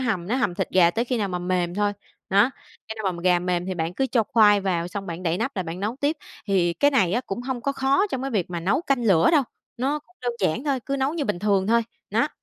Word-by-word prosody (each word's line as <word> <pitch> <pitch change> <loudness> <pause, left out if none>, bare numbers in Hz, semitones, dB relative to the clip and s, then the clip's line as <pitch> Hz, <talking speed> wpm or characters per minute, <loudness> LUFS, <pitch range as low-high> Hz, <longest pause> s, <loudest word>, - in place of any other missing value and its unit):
hầm 215 -9 -1
nó 235 +6 0
hầm 225 -9 0
thịt 190 0 -2
gà 175 -2 +5
tới 230 +7 -1
khi 250 0 -1
nào 205 - -1
mà 180 -1 -3
mềm 180 -1 -1
thôi. 205 0 +1 0.4
Nó, 205 +6 +4 0.4
cho 220 - -4
nên 190 -3 -1
mà 170 - -8
gà 180 -1 +4
mềm 180 0 -1
thì 185 - -2
bạn 165 +1 -3
cứ 265 - 0
cho 235 -3 +2
khoai 210 -5 +4
vào, 175 -3 -1
xong 195 +1 -6
bạn 170 +1 -6
đậy 170 0 0
nắp 270 - -3
lại 185 - 0
bạn 170 +2 -6
nấu 220 +5 -2
tiếp, 295 +3 +1 0.3
thì 180 -4 +2
cái 285 +10 +3
này 195 -11 +2
á 240 - +1
cũng 215 -2 -5
hông 255 -1 -3
có 280 +3 -1
khó 275 +9 +2
trong 265 0 -3
cái 270 - -3
việc 190 -6 -1
mà 170 -1 -3
nấu 200 - +1
canh 270 -6 0
lửa 185 -7 +4
đâu. 295 - +5 0.3
Nó 275 +5 0
cũng 360 +5 -26
đơn 245 -1 -1
giản 190 - 0
thôi, 275 -4 0
cứ 275 0 -1
nấu 270 +3 0
như 310 -4 -1
bình 210 -5 -1
thường 195 -1 +1
thôi, 235 +2 +3 0.3
nó. - - +2
205 Hz, 285 wpm, -24 LUFS, 180-260 Hz, 0.4 s, gà